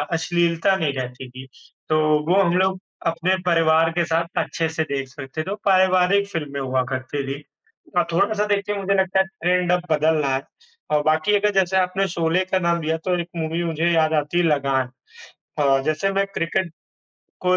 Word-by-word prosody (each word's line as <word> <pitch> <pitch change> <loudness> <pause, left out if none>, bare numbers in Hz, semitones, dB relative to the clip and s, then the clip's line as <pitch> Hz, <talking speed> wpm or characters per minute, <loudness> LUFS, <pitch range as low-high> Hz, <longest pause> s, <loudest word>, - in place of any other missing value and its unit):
अश्लीलता 170 +3 +1
नहीं 160 -6 -1
रहती 125 0 -6
थी। 130 +1 -10 0.4
तो 155 - +2 0.3
वो 190 +2 +4
हम 175 -1 +1
लोग 190 0 +1 0.3
अपने 165 +3 +1
परिवार 165 -1 +3
के 170 - +3
साथ 170 +1 0
अच्छे 165 -1 -2
से 160 0 -2
देख 135 -1 -2
सकते 135 +3 -6
थे, 180 - -6
वो 205 - -3
पारिवारिक 185 0 +3
फ़िल्में 145 -6 -4
हुआ 130 -1 0
करती 130 +2 -4
थी। 145 - -10 0.6
अ, 175 - +5
थोड़ा-सा 205 +5 +1
देखिए 205 +1 -3
मुझे 195 0 0
लगता 190 0 0
है 190 - +3
ट्रेंड 180 -1 0
अब 180 0 +2
बदल 155 +1 +3
रहा 135 -2 +1
है 135 - -2 0.5
और 150 -1 +2
बाकी 155 +7 +2
अगर 210 +1 +1
जैसे 190 0 +1
आपने 190 +1 +1
शोले 170 +3 +1
का 190 - +2
नाम 170 -1 +1
दिया, 160 +1 -1
तो 180 +2 -1
एक 170 - -4
मूवी 165 +1 -2
मुझे 165 0 0
याद 160 -1 +2
आती 150 +2 0
है 175 - +3
लगान 135 -4 +1 0.7
अ, 135 -2 +3
जैसे 155 +6 0
मैं 195 0 +1
क्रिकेट 170 0 -1 0.7
को 185 0 +2
170 Hz, 190 wpm, -22 LUFS, 155-185 Hz, 0.7 s, अ